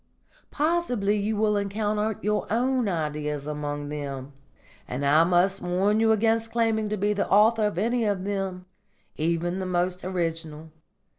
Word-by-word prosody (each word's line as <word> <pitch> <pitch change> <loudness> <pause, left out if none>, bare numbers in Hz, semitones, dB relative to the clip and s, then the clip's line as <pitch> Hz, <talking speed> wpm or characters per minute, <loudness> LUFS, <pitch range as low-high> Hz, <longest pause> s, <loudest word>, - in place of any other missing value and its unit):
Possibly 290 -10 0
you 210 +1 -1
will 210 0 +2
encounter 210 +1 -1
your 210 0 -1
own 250 0 +1
ideas 150 -4 -2
among 145 -1 -4
them; 140 -2 -5 0.5
and 130 +3 -3
I 150 +3 +5
must 180 +2 +2
warn 190 +4 +1
you 225 0 +4
against 225 +1 +1
claiming 225 -2 +1
to 215 - -2
be 205 +2 +1
the 200 - -2
author 215 +2 +4
of 205 - -5
any 230 +4 +1
of 200 -3 0
them, 195 -2 -3 0.5
even 170 +3 -1
the 190 - -3
most 180 0 -1
original. 165 -3 -3
195 Hz, 150 wpm, -26 LUFS, 165-215 Hz, 0.5 s, I